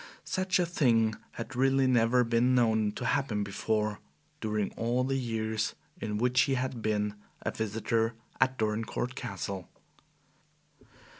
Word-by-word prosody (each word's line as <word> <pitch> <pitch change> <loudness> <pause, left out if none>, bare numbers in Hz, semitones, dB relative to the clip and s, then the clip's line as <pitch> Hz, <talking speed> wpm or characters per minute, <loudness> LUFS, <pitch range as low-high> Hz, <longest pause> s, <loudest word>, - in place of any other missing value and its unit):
Such 185 0 +1
a 180 - +2
thing 115 -10 +3 0.2
had 115 - -6
really 135 +1 +3
never 125 0 +4
been 120 +2 +3
known 110 -3 +3
to 125 - -5
happen 115 -5 +1
before 105 +1 -1 0.4
during 105 -3 -1
all 120 +2 0
the 135 +1 0
years 110 -3 -1 0.2
in 105 -1 -2
which 125 +3 +3
he 135 - +2
had 130 -2 -2
been 105 -1 0 0.3
a - - 0
visitor 115 +1 0 0.2
at 130 0 +3
Dorincourt 110 +3 -1
Castle. 100 -6 -5
115 Hz, 135 wpm, -30 LUFS, 110-125 Hz, 0.4 s, never